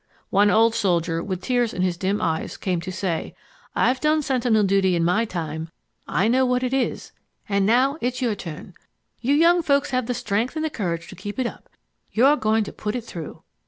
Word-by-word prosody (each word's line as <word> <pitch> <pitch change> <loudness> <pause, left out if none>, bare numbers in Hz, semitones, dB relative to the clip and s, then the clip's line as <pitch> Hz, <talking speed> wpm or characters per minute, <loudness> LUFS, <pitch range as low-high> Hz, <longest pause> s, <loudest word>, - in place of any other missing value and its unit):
One 205 +1 +4
old 225 +2 +4
soldier 175 -6 0
with 185 -2 -4
tears 245 -3 0
in 180 - 0
his 180 -2 +1
dim 195 +3 -1
eyes 160 -1 -2
came 180 -3 -1
to 185 +2 -5
say, 180 -3 -3 0.4
"I've 255 +1 +2
done 305 +1 +2
sentinel 245 -5 +2
duty 190 -2 +3
in 170 - +1
my 210 +7 +2
time. 160 -5 -5 0.4
I 195 - +1
know 255 +3 +3
what 250 0 +1
it 255 0 -1
is... 270 -2 -1 0.4
And 200 -2 +1
now 265 +6 +3
it's 250 +1 -1
your 240 -4 +1
turn. 175 -2 -8 0.5
You 270 +4 +2
young 340 +3 +5
folks 280 -2 +1
have 255 -2 0
the 245 - -1
strength 220 +6 -1
and 315 0 -1
the 315 - -2
courage 170 -7 -3
to - - -10
keep 205 +3 -7
it 260 - 0
up.... - - -7 0.4
You 235 +4 +3
are 290 +2 +6
going 220 -3 +1
to - - -8
put 210 +2 -4
it 245 - -3
through!" 170 -8 -8
220 Hz, 215 wpm, -23 LUFS, 185-255 Hz, 0.5 s, are